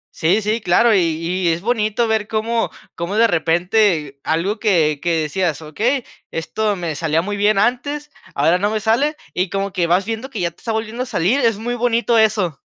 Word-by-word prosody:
Sí, 190 +7 +2
sí, 215 +2 0
claro, 220 +5 +4
y 195 - +4
y 170 +2 -1
es 165 +1 +1
bonito 225 0 0
ver 220 -2 0
cómo 225 +1 -1 0.2
cómo 170 +4 -4
de 225 +2 +5
repente 175 -4 +1
algo 180 +7 -1
que 160 -9 +2
que 170 -1 +1
decías: 165 -1 -1
"Okey, 230 - -1 0.3
esto 205 +6 -2
me 170 -4 -3
salía 160 +2 0
muy 205 +1 -3
bien 205 +1 +2
antes, 285 +7 0 0.2
ahora 160 +5 +3
no 205 +2 +1
me 215 0 -1
sale". 240 +8 +1 0.2
Y 185 0 -1
como 195 -1 -2
que 170 -2 0
vas 185 +3 +2
viendo 225 +4 -4
que 230 - -6
ya 170 -1 -1
te - - -34
está 230 - -4
volviendo 220 +2 -3
a 255 - -1
salir, 205 +10 +1
es 230 -5 +2
muy 240 +3 -3
bonito 235 -1 +2
eso. 210 -9 +1
205 Hz, 205 wpm, -19 LUFS, 170-225 Hz, 0.3 s, de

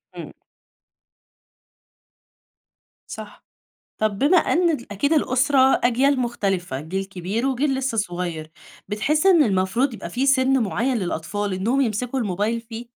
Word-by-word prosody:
امم. - - -8 2.8
صح. - - -10 0.5
طَب 215 -2 -1
بما 290 - +4
أن 345 +1 +2 0.2
أكيد 280 +10 0
الأسرة 265 -2 +3
أجيال 260 +3 +2
مختلفة، 195 - -2
جيل 185 +6 -4
كبير 195 +5 -3
وجيل 270 +1 0
لسه 265 -3 -2
صغير، 175 -6 -3 0.4
بتحس 300 - 0
إن 355 -5 +6
المفروض 215 +6 0
يبقى 190 -5 -8
في 255 +8 -1
سَنّ 265 -1 +3
معيّن 240 +5 -1
للأطفال 195 +2 -3
إنهم 220 +9 0
يمسكوا 250 +1 -1
الموبايل 210 +1 -1
فيه؟ 230 +1 -9
230 Hz, 120 wpm, -22 LUFS, 195-265 Hz, 2.8 s, إن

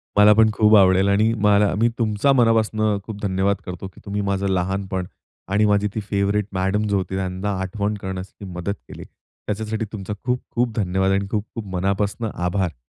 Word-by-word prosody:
मला 105 +1 +7
पण 110 +1 +5
खूप 110 0 +5
आवडेल 95 0 +5
आणि 105 +3 +3
मला 105 0 +4
मी 115 +1 +4
तुमचा 110 +4 +2
मनापासनं 110 -3 +2
खूप 105 0 -8
धन्यवाद 95 0 +1
करतो, 90 +1 -6
की 95 - -16
तुम्ही 100 0 -2
माझं 100 0 -1
लहानपण 95 0 -1 0.4
आणि 105 +2 +2
माझी 105 0 +2
ती - - 0
फेवरेट 100 0 0
मॅडम 95 +3 0
जी 100 - 0
होती, 95 -1 -2
त्यांना 95 +1 -2
आठवण 100 +2 -2
करण्यासाठी 95 +1 -6
मदत 90 +3 -3
केली. - - -9
त्याच्यासाठी 110 +1 -6
तुमचा 105 -1 -5
खूप-खूप 125 -1 -1
धन्यवाद. 95 -1 +1
आणि 100 0 0
खूप-खूप 110 +1 -4
मनापासनं 100 +4 -1
आभार. 90 -4 -1
100 Hz, 165 wpm, -22 LUFS, 95-105 Hz, 0.4 s, मला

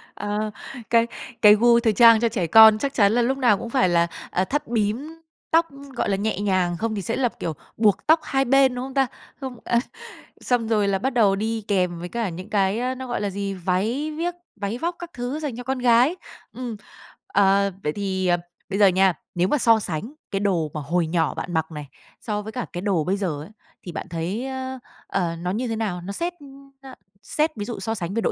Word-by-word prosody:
Ờ, 210 +1 -2 0.4
cái 230 0 +4 0.3
cái 210 -1 +8
gu 235 +2 +5
thời 225 -2 +2
trang 230 +1 +7
cho 235 0 +2
trẻ 185 -6 -1
con 220 +4 +8
chắc 275 +4 -2
chắn 205 -2 +4
là 240 - +3
lúc 265 +3 +1
nào 240 -6 +4
cũng 235 - -6
phải 240 -7 +2
là, 170 0 +3 0.2
ờ, 185 - +1
thắt 290 +7 -2
bím 240 +9 -2 0.3
tóc, 330 +1 +4 0.3
gọi - - -1
là, 195 - +2
nhẹ 210 -1 -1
nhàng, 185 -4 +1
không 220 +2 -2
thì 200 - -2
sẽ 230 - -2
là 250 -3 +1
kiểu 160 - -2 0.2
buộc 215 +2 +2
tóc 320 +1 +6
hai 270 -1 0
bên, 270 0 +4
đúng 250 +1 -3
không 265 - -8
ta? 270 -2 +2 0.3
Không 260 -3 -6
à, 235 - +2 0.6
xong 245 -3 0
rồi 210 -3 +2
là 195 -1 +1
bắt 265 - 0
đầu 205 -5 +4
đi 220 +2 -2
kèm 180 -4 0
với 175 +1 -6
cả 230 -4 -2
những 185 +5 -8
cái, 200 +1 +1
ơ, 255 +1 -1
nó 260 0 -7
gọi 240 - -2
là 205 - -1
gì, 200 0 -3
váy 195 - -1
viếc, 350 +1 -1 0.2
váy 205 +3 -3
vóc 340 +5 -2
các 345 -1 -7
thứ 250 +5 -4
dành 280 -7 -4
cho 245 - -6
con 265 0 -2
gái. 245 +7 +4 0.4
Ừm, 245 -3 -5 0.5
ờ, 200 0 +3
vậy 150 0 -1
thì, 190 -2 -2
ờ, 175 0 +3 0.3
bây 195 +1 -2
giờ 200 - +7
nha, 190 0 +4 0.2
nếu 175 +1 +2
mà 295 - +2
so 230 -3 +4
sánh 195 - -5 0.2
cái 195 - 0
đồ 175 -7 0
mà 155 - -4
hồi 165 +3 0
nhỏ 165 -1 0
bạn 175 - -5
mặc 160 0 -1
này 150 -2 -7 0.3
so 210 -2 -2
với 220 +1 -7
cả 250 0 -4
cái 175 - -4
đồ 190 -6 +1
bây 190 +5 0
giờ 165 -7 -2
ấy, 155 - -10 0.3
thì 175 - -7
bạn - - -6
thấy, 180 +9 -3
ơ, 260 -1 -5 0.3
ờ, 170 -3 -1
nó 180 +2 -3
như 240 +5 -2
thế 225 - -2
nào? 200 -6 -2
Nó 195 +3 -6
xét, 345 - -2 0.5
ơ, 265 -1 -11 0.3
xét 310 +7 0
ví 205 -1 -4
dụ 230 -4 -5
so 225 +4 -2
sánh 180 -1 -4
về 230 - 0
độ - - +1
215 Hz, 235 wpm, -23 LUFS, 190-245 Hz, 0.6 s, cái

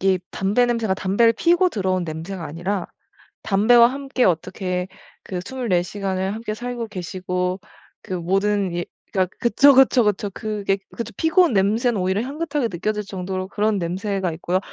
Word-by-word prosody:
이게 190 -1 +3
담배 205 +6 +1
냄새가 230 -5 0
담배를 200 +5 +3
피우고 350 +7 +3
들어온 185 - -1
냄새가 165 +3 -6
아니라 175 +5 -3 0.6
담배와 220 +4 +5
함께 270 -1 -1
어떻게 180 +1 -1 0.4
그 180 -2 -4
24 230 -7 0
시간을 190 0 -3
함께 220 -1 -4
살고 240 0 -5
계시고 180 -1 -3 0.4
그 - - -8
모든 195 +1 0
예. 175 - -2 0.3
그니까 185 -2 +1
그쵸, 275 +5 +6
그쵸, 260 -2 +5
그쵸. 205 -1 0
그게 205 -1 -2
그것도 230 -1 -6
피고 325 +3 +4
온 335 - +2
냄새는 215 +4 +2
오히려 190 +3 0
향긋하게 285 -1 -2
느껴질 210 +4 -2
정도로 185 -1 -4
그런 210 +1 0
냄새가 190 +2 -2
있고요. 175 +3 -1
200 Hz, 350 characters per minute, -22 LUFS, 185-235 Hz, 0.6 s, 그쵸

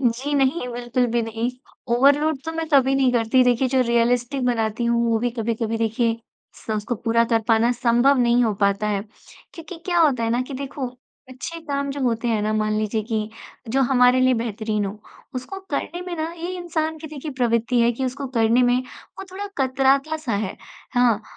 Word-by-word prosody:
जी 260 +4 0
नहीं, 270 0 +1
बिल्कुल 245 +1 0
भी 235 - +2
नहीं। 225 +2 -2 0.4
ओवरलोड 285 +4 +3
तो 320 - -4
मैं 325 0 -3
कभी 270 -1 +4
नहीं 265 -2 +3
करती। 240 +2 +3
देखिए 250 +1 +2
जो 260 0 +2
रियलिस्टिक 240 +3 +1
बनाती 230 -1 0
हूँ 235 0 +2
वो 225 - +2
भी 245 +2 -1
कभी-कभी 225 0 -1
देखिए 225 +1 0 0.4
स - - -17
उसको 210 +3 -2
पूरा 230 +1 +1
कर 230 -1 +1
पाना 225 +1 +4
संभव 245 +3 +3
नहीं 240 0 +3
हो 220 - +1
पाता 200 +1 +1
है। 200 -2 -1 0.5
क्योंकि 330 0 -9
क्या 350 -2 +1
होता 275 -8 +3
है 225 - 0
ना 240 +2 +1
कि 265 +1 -8
देखो 265 -2 -5 0.3
अच्छे 260 +6 -7
काम 280 -2 -2
जो 280 - -5
होते 235 -1 0
हैं 220 -2 +1
ना 215 - 0
मान 215 0 0
लीजिए 215 0 -1
कि 215 -2 -1 0.4
जो 270 - +2
हमारे 250 0 +5
लिए 255 0 +4
बेहतरीन 215 -2 -2
हो 200 +2 -5 0.4
उसको 255 +10 -5
करने 330 +4 -3
में 355 - -4
ना 315 - -2
ये 340 +2 -4
इंसान 320 -2 -2
की 315 - -8
देखिए 300 0 -7
प्रवृत्ति 240 -1 +1
है 235 0 +4
कि 260 +3 -3
उसको 270 +2 -3
करने 230 +2 +4
में 245 0 +3 0.4
वो - - -6
थोड़ा 395 +2 -5
कतराता-सा 270 +2 +1
है, 200 -1 -2 0.4
हाँ। 240 -3 +3
245 Hz, 195 wpm, -22 LUFS, 230-275 Hz, 0.5 s, हमारे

